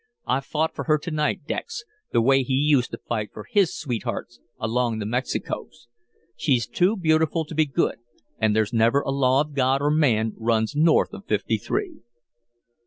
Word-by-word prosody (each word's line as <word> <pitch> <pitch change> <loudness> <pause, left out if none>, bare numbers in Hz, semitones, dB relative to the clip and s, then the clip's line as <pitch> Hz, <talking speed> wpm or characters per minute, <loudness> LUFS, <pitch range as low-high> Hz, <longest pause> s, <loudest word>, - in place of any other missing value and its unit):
I - - +1
fought 155 +3 -2
for - - -5
her 155 -1 +3
to 165 +3 -6
night 150 -1 -1
Dex - - -4 0.3
the 115 - +3
way 135 +2 +4
he 130 0 -1
used 140 -3 +3
to - - -6
fight 110 -3 -3
for 105 - -9
his 200 -5 +2
sweethearts 120 -3 -4 0.2
along 115 +1 0
the 105 - -3
Mexicos. 120 +1 -4 0.5
She's 125 -6 +1
too 185 - +1
beautiful 160 -2 +2
to 155 - -9
be 155 0 +2
good 135 - 0 0.4
and 110 -1 +2
'there's 110 +1 +1
never 115 +5 +3
a 135 - -3
law 135 0 +3
of 150 0 -5
God 135 0 +2
or 145 +1 +1
man 115 -8 +2
runs 110 +1 0
north 160 +2 +3
of - - -9
Fifty - - 0
three.'" 370 -6 -3
135 Hz, 180 wpm, -24 LUFS, 115-155 Hz, 0.5 s, way